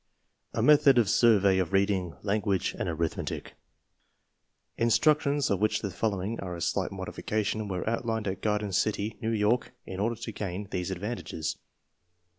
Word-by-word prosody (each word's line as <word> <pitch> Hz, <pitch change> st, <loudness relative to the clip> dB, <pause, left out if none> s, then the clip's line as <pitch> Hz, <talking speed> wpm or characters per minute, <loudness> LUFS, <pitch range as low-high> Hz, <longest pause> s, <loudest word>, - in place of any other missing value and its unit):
A -, -, +1 dB
METHOD 145 Hz, -3 st, +6 dB
OF 115 Hz, -4 st, +4 dB
SURVEY 100 Hz, -3 st, +4 dB
OF 90 Hz, -1 st, -1 dB
READING, 95 Hz, -4 st, +1 dB
LANGUAGE, 100 Hz, -2 st, 0 dB
AND -, -, -1 dB
ARITHMETIC 80 Hz, -1 st, -3 dB, 1.2 s
Instructions 145 Hz, +3 st, +2 dB
(of 100 Hz, -, +1 dB
which 105 Hz, +1 st, +1 dB
the 100 Hz, -, -2 dB
following 105 Hz, +2 st, -2 dB
are 90 Hz, -2 st, -5 dB
a 85 Hz, -, -7 dB
slight -, -, 0 dB
modification) 110 Hz, 0 st, -2 dB
were 95 Hz, -1 st, -3 dB
outlined 115 Hz, -2 st, -1 dB
at 95 Hz, -1 st, -3 dB
Garden 105 Hz, -1 st, 0 dB
City, 105 Hz, +2 st, 0 dB
New 110 Hz, -, -1 dB
York, 115 Hz, +3 st, +1 dB
in 95 Hz, -, -6 dB
order 115 Hz, +4 st, 0 dB
to 115 Hz, 0 st, -6 dB
gain 100 Hz, -1 st, -4 dB
these 90 Hz, -1 st, -2 dB
advantages. 95 Hz, -5 st, -4 dB
105 Hz, 150 wpm, -28 LUFS, 95-115 Hz, 1.2 s, METHOD